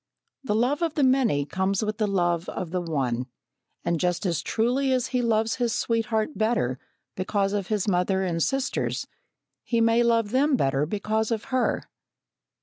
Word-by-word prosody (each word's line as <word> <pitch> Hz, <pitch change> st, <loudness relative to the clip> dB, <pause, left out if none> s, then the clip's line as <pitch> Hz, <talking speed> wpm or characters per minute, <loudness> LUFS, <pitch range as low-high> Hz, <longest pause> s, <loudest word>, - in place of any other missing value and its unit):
The 210 Hz, -6 st, 0 dB
love 250 Hz, +7 st, +1 dB
of 330 Hz, -2 st, 0 dB
the 290 Hz, -, +2 dB
many 255 Hz, -, +3 dB
comes 190 Hz, +6 st, -1 dB
with 215 Hz, +1 st, -3 dB
the 215 Hz, -, +2 dB
love 175 Hz, -3 st, 0 dB
of 175 Hz, -3 st, -5 dB
the 180 Hz, 0 st, -1 dB
one, 130 Hz, -7 st, -1 dB, 0.6 s
and 170 Hz, -1 st, 0 dB
just 180 Hz, +4 st, 0 dB
as 170 Hz, -4 st, 0 dB
truly 250 Hz, +8 st, +1 dB
as 255 Hz, -1 st, +1 dB
he 250 Hz, -1 st, 0 dB
loves 225 Hz, -1 st, +1 dB
his 240 Hz, -3 st, 0 dB
sweetheart 225 Hz, +1 st, 0 dB
better 215 Hz, -, 0 dB, 0.4 s
because 195 Hz, +1 st, 0 dB
of 200 Hz, -3 st, -2 dB
his 210 Hz, -3 st, -1 dB
mother 190 Hz, 0 st, +1 dB
and 170 Hz, -3 st, -1 dB
sisters, 265 Hz, -, -1 dB, 0.6 s
he 235 Hz, -, 0 dB
may 230 Hz, +1 st, +4 dB
love 230 Hz, -3 st, +2 dB
them 275 Hz, +3 st, +3 dB
better 135 Hz, -, +1 dB
because 215 Hz, +3 st, -1 dB
of 225 Hz, -3 st, -1 dB
her. 255 Hz, -, +1 dB
215 Hz, 170 wpm, -26 LUFS, 180-235 Hz, 0.6 s, may